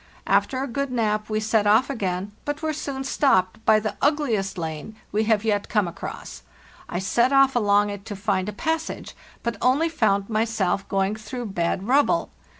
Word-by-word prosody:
After 260 Hz, -1 st, +1 dB
a -, -, -3 dB
good 280 Hz, +2 st, -3 dB
nap 215 Hz, -3 st, 0 dB
we 215 Hz, 0 st, 0 dB
set 215 Hz, -1 st, +1 dB
off 220 Hz, +5 st, +5 dB
again, 195 Hz, -6 st, -3 dB
but 290 Hz, +2 st, -4 dB
were 315 Hz, 0 st, 0 dB
soon 280 Hz, -3 st, -4 dB
stopped 225 Hz, -6 st, +1 dB
by 215 Hz, 0 st, +6 dB
the 215 Hz, 0 st, -4 dB
ugliest 240 Hz, -11 st, +1 dB
lane 160 Hz, +5 st, -5 dB, 0.2 s
we 215 Hz, +2 st, +1 dB
have 220 Hz, -1 st, +2 dB
yet 205 Hz, -2 st, 0 dB
come 210 Hz, -4 st, +2 dB
across. 170 Hz, -, -7 dB, 0.5 s
I -, -, -3 dB
set 235 Hz, +7 st, +2 dB
off 275 Hz, -1 st, +5 dB
along 205 Hz, -2 st, +3 dB
it 200 Hz, -1 st, -7 dB
to 210 Hz, -, -6 dB
find 195 Hz, -1 st, -1 dB
a -, -, -3 dB
passage, 320 Hz, +9 st, -3 dB, 0.3 s
but 235 Hz, -2 st, -2 dB
only 275 Hz, +7 st, +3 dB
found 200 Hz, -9 st, +1 dB
myself 215 Hz, -4 st, 0 dB
going 195 Hz, +1 st, +1 dB
through 240 Hz, +3 st, -6 dB
bad 175 Hz, +3 st, -1 dB
rubble. 290 Hz, +6 st, +2 dB
215 Hz, 180 wpm, -24 LUFS, 200-265 Hz, 0.5 s, by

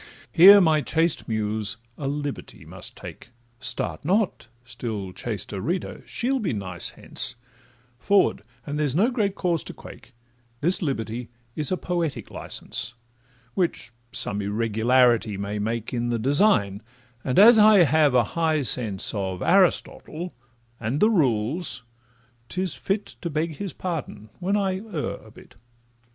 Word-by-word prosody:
Here 195 Hz, +4 st, +9 dB
my 160 Hz, -5 st, +3 dB
chaste 165 Hz, +2 st, 0 dB
Muse 110 Hz, -1 st, -1 dB, 0.2 s
a 140 Hz, -, -5 dB
liberty 145 Hz, 0 st, -5 dB
must -, -, -6 dB
take— -, -, -10 dB, 0.3 s
Start 130 Hz, -, -1 dB
not! 190 Hz, -, 0 dB, 0.2 s
still 110 Hz, -6 st, -5 dB
chaster 105 Hz, -3 st, -4 dB
reader—she'll 225 Hz, -, -2 dB
be 200 Hz, -, -2 dB
nice 95 Hz, -4 st, -2 dB
hence— 130 Hz, -1 st, -3 dB, 0.6 s
Forward, 200 Hz, -, +2 dB, 0.2 s
and 145 Hz, +1 st, -4 dB
there 150 Hz, -, +1 dB
is 135 Hz, -, -2 dB
no 220 Hz, +9 st, +3 dB
great 205 Hz, -5 st, -1 dB
cause 170 Hz, -3 st, 0 dB
to -, -, -8 dB
quake; 115 Hz, +1 st, -14 dB, 0.4 s
This 175 Hz, +9 st, +2 dB
liberty 120 Hz, -6 st, -3 dB, 0.3 s
is 150 Hz, +1 st, +1 dB
a 185 Hz, -, +1 dB
poetic 170 Hz, -5 st, -3 dB
licence, 120 Hz, +1 st, -4 dB, 0.6 s
Which 175 Hz, -8 st, -1 dB, 0.2 s
some 105 Hz, 0 st, 0 dB
irregularity 115 Hz, +1 st, +2 dB
may 100 Hz, +1 st, -4 dB
make 115 Hz, +2 st, -3 dB
In 120 Hz, 0 st, -1 dB
the 120 Hz, -, 0 dB
design, 115 Hz, -, +3 dB, 0.4 s
and 130 Hz, -, -2 dB
as 220 Hz, +3 st, +8 dB
I 210 Hz, -3 st, +7 dB
have 155 Hz, -4 st, +3 dB
a 125 Hz, -, +5 dB
high 160 Hz, -3 st, +1 dB
sense 110 Hz, -6 st, +2 dB
Of 95 Hz, -3 st, -3 dB
Aristotle 180 Hz, -2 st, +1 dB, 0.5 s
and 115 Hz, +5 st, -2 dB
the 215 Hz, +5 st, +4 dB
Rules, 125 Hz, -, +1 dB, 0.7 s
'tis 185 Hz, -3 st, -2 dB
fit 200 Hz, +1 st, -2 dB, 0.2 s
To 170 Hz, -, -3 dB
beg 155 Hz, 0 st, -2 dB
his 200 Hz, -3 st, -4 dB
pardon 155 Hz, -, -6 dB
when 195 Hz, +3 st, 0 dB
I 190 Hz, -2 st, -1 dB
err 195 Hz, -8 st, -4 dB
a -, -, -16 dB
bit. -, -, -17 dB
145 Hz, 140 wpm, -24 LUFS, 115-180 Hz, 0.7 s, Here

